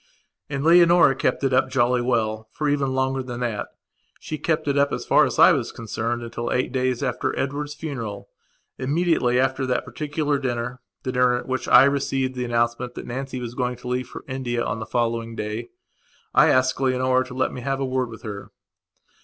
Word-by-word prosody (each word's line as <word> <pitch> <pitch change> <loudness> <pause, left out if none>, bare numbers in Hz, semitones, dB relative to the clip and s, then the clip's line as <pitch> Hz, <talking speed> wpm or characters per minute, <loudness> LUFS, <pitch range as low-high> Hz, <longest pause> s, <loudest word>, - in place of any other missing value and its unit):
And 140 -1 -3
Leonora 170 -2 +6
kept 135 - 0
it 135 -1 +1
up 130 0 +3
jolly 125 -1 +2
well, 110 -3 -1
for 150 - -2
even 140 -2 0
longer 130 0 0
than 125 -1 -6
thatshe 120 +6 -7
kept 160 -2 0
it 140 - +1
up 140 0 +3
as - - -3
far - - +5
as - - -4
I - - +8
was - - 0
concerned 115 +1 -3
until 120 0 -4
eight 125 - 0
days 130 0 0
after 125 -3 -1
Edward's 145 +2 -3
funeral. 115 -11 -6 0.5
Immediately 140 -3 +1
after 130 0 0
that 125 - 0
particular 150 -1 -2
dinnerthe 125 -1 -3 0.2
dinner 125 -1 +2
at 125 - -5
which 130 -1 -2
I - - +8
received 135 -1 0
the 125 -1 -3
announcement 120 +1 -1
that - - -7
Nancy 130 +1 -5
was 120 -1 -6
going 125 0 -1
to 125 +1 -11
leave 125 0 -2
for - - -10
India 125 -3 -2
on 105 - -2
the 110 - -6
following 115 -1 -1
dayI 105 +3 -4 0.7
asked 130 +1 +4
Leonora 130 0 +2
to 125 -1 -10
let 130 - 0
me 125 - -6
have 135 +2 -2
a 135 - 0
word 130 -1 -1
with 115 - -11
her. 105 -3 -7
130 Hz, 190 wpm, -23 LUFS, 120-135 Hz, 0.7 s, I